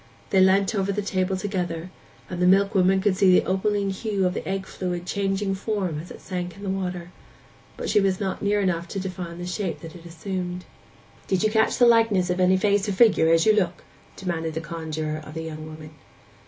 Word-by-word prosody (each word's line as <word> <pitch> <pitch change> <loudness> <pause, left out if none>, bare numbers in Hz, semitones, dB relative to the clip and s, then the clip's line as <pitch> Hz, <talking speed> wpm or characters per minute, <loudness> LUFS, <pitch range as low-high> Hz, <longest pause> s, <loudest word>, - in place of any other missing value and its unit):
They 190 - +4
leant 190 +3 +4
over 200 -1 0
the 205 +1 -2
table 190 -1 0
together, 180 -3 -3 0.4
and 180 -1 -5
the 180 - +4
milkwoman 195 0 +4
could 200 -1 +2
see 190 0 +4
the - - -4
opaline 200 +1 0
hue 195 -1 -1
of 180 - +1
the - - -5
egg 190 0 -2
fluid 180 -2 -4
changing 195 +1 -1
form 190 -5 -2
as 170 - -9
it - - -11
sank 180 -1 -5
in 200 - -11
the 195 - -2
water, 180 -2 -4 0.7
but - - -4
she 210 - +3
was 190 -1 +1
not 190 -2 -3
near 205 0 +1
enough 175 -3 0
to 195 - -4
define 180 -3 -5
the 175 - -6
shape 185 +2 -3
that 165 -1 -10
it 170 -1 -11
assumed. 180 +1 -5 0.6
'Do - - +1
you 215 +3 +1
catch 220 0 +2
the 245 - +6
likeness 225 -6 +4
of 180 - -1
any 185 +1 +4
face 205 +1 +1
or - - 0
figure 190 -6 +5
as 165 0 +4
you 215 - +6
look?' 185 -4 0 0.3
demanded 165 -4 -3
the - - -1
conjuror 155 -1 -4
of 155 - -11
the 160 - -4
young 155 -1 -7
woman. 155 0 -10
185 Hz, 215 wpm, -24 LUFS, 175-200 Hz, 0.7 s, the